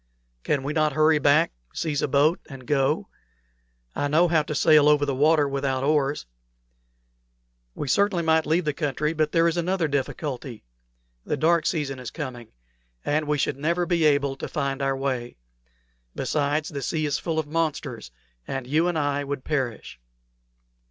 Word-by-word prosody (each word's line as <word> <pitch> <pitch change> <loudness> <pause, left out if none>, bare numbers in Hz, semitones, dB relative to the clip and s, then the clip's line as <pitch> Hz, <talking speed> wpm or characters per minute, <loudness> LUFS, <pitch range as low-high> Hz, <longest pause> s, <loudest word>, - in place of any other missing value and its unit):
"Can 140 -3 0
we 145 +2 -3
not 155 -2 +1
hurry 155 0 +4
back, 145 +3 +4 0.2
seize 150 -4 -1
a - - +1
boat, 145 +5 +3
and 135 -3 -10
go? 135 -2 +1 0.9
I 145 - 0
know 160 +5 +4
how 165 -2 +3
to 150 0 -5
sail 150 0 +5
over 145 -1 +4
the 140 - -1
water 150 +2 +3
without 135 -1 -1
oars." 145 - +1 1.5
"We 145 - -4
certainly 185 +4 +2
might 160 -1 +2
leave 165 +2 +1
the 150 - 0
country; 150 +1 -1
but 155 -1 0
there 165 0 +3
is 170 +1 0
another 175 -1 0
difficulty. 135 -3 -4 0.6
The 150 - -2
dark 165 +3 +2
season 140 -6 -2
is 125 - -6
coming, 130 -7 -7 0.6
and 150 +1 0
we 150 0 +1
should 140 0 -1
never 170 +5 0
be 170 -1 +1
able 140 -2 +2
to - - -5
find 140 -2 -2
our 135 0 0
way. 130 -3 -3 0.8
Besides, 150 +1 -1
the 140 -3 -5
sea 155 +4 -1
is 145 -1 -1
full 165 -2 -3
of 160 - 0
monsters, 150 - -3 0.4
and 135 -2 -4
you 155 +6 +1
and 175 -2 -1
I 145 -1 0
would 140 -2 -4
perish." 130 - -3
150 Hz, 170 wpm, -25 LUFS, 140-160 Hz, 1.5 s, sail